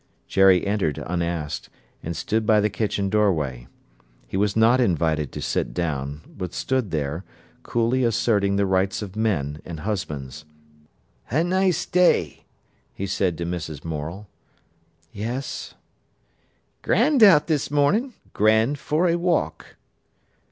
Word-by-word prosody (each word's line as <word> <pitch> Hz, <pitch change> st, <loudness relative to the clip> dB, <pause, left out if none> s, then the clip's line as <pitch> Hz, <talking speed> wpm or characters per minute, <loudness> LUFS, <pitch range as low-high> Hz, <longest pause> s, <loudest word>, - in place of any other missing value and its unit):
Jerry 95 Hz, -2 st, +4 dB
entered 100 Hz, -7 st, 0 dB
unasked, 85 Hz, -3 st, -3 dB, 0.3 s
and 85 Hz, -1 st, -5 dB
stood 110 Hz, +7 st, -1 dB
by 110 Hz, 0 st, +4 dB
the 105 Hz, 0 st, +1 dB
kitchen 100 Hz, -1 st, -1 dB
doorway. 80 Hz, -, 0 dB, 0.6 s
He -, -, -7 dB
was 100 Hz, +1 st, +1 dB
not 115 Hz, +3 st, +4 dB
invited 80 Hz, -, +1 dB
to -, -, -6 dB
sit -, -, -2 dB
down, 75 Hz, -4 st, -3 dB, 0.2 s
but 90 Hz, -2 st, -5 dB
stood 130 Hz, -6 st, -1 dB
there, 75 Hz, +2 st, -3 dB, 0.4 s
coolly 120 Hz, +2 st, 0 dB
asserting 105 Hz, -4 st, +2 dB
the 100 Hz, 0 st, +2 dB
rights 95 Hz, +2 st, 0 dB
of 95 Hz, -2 st, -9 dB
men 80 Hz, -10 st, -1 dB
and 80 Hz, -3 st, -7 dB
husbands. 75 Hz, -8 st, -4 dB, 0.9 s
"A 150 Hz, +8 st, +2 dB
nice 185 Hz, 0 st, +1 dB
day," 180 Hz, 0 st, +2 dB, 0.5 s
he 100 Hz, -, -3 dB
said 90 Hz, -3 st, -1 dB
to 85 Hz, -, -3 dB
Mrs. 85 Hz, -4 st, -5 dB
Morel. 80 Hz, +6 st, -5 dB, 0.8 s
"Yes. 120 Hz, +6 st, -5 dB, 1.1 s
"Grand 290 Hz, -5 st, +2 dB
out 185 Hz, -9 st, +7 dB
this 155 Hz, -4 st, 0 dB
morning—grand 145 Hz, -, +1 dB
for 160 Hz, +6 st, +1 dB
a 170 Hz, 0 st, +2 dB
walk." 175 Hz, -2 st, -1 dB
100 Hz, 125 wpm, -23 LUFS, 80-120 Hz, 1.1 s, out